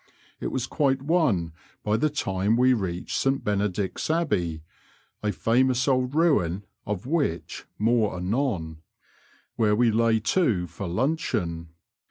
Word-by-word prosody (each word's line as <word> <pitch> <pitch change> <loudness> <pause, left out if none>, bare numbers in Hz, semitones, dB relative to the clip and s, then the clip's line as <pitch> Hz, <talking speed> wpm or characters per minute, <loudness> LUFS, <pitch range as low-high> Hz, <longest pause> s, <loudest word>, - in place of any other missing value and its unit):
It - - -3
was 125 -2 -2
quite 135 -3 0
one 135 - +1 0.3
by 105 0 +1
the 155 +8 +2
time 105 -5 0
we 130 +1 +5
reached 90 -6 -3
St 135 0 +1
Bene 105 0 +1
dict's 95 - -3
Abbey 90 - 0 0.6
(a 105 - 0
famous 125 +3 +2
old 130 0 +1
ruin, 100 - +2 0.2
of 105 +1 -3
which 140 - -2
more 110 -3 +1
anon), 90 - -2 0.8
where 105 -3 +3
we 120 +1 +3
lay 115 0 +3
to 110 - +1
for 85 +3 -7
luncheon. 85 - -1
110 Hz, 135 wpm, -26 LUFS, 90-130 Hz, 0.8 s, we